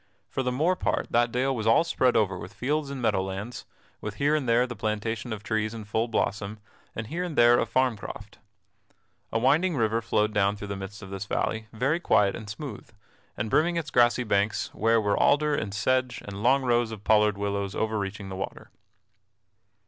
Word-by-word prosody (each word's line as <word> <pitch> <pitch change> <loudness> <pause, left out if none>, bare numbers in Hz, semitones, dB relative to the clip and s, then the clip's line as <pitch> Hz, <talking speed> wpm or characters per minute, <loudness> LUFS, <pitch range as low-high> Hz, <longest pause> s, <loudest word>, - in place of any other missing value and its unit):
For - - -2
the 125 -1 -1
more 160 +9 +2
part - - -1
that 120 0 +3
dale 130 +2 0
was 110 -2 -2
all 115 +8 +5
spread 130 -6 +2
over 100 -4 +2
with 90 +3 -9
fields 145 +3 -1
and 135 -3 -5
meadow 95 - +2
lands, 95 +5 -6 0.3
with 105 -1 -5
here 145 +2 +2
and 140 -6 -1
there 115 +1 +4
a - - -2
plantation 110 +1 -3
of 105 -1 -5
trees 110 0 -1
in 110 -2 -7
full 110 +2 0
blossom 105 -2 -2 0.4
and 110 - -4
here 170 +10 -3
and 175 -5 -5
there 120 0 +6
a - - 0
farm 130 -3 +1
croft. 105 0 -9 0.9
A - - +1
winding 150 +9 +3
river 115 -2 +1
flowed 110 -2 +1
down 100 0 +2
through 105 -1 -8
the 100 - -3
midst 100 +1 -8
of 95 - -10
this 100 0 -4
valley, 110 +2 -1
very 135 +9 0
quiet 100 - +3
and 110 -3 -8
smooth, 115 0 -7 0.5
and 105 - -2
brimming 170 +3 +3
its 160 -3 -3
grassy 120 0 +4
banks, 105 -1 0
where 115 +1 +3
were 105 -2 +1
alder 150 +1 +3
and 105 - -2
sedge 130 +4 0
and 100 0 -7
long 130 +4 +3
rows 120 -2 +2
of 110 -2 -8
pollard 105 -1 +3
willows 100 -1 -2
overreaching 105 -2 -2
the 95 - -5
water. 95 - -6
110 Hz, 200 wpm, -27 LUFS, 105-130 Hz, 0.9 s, there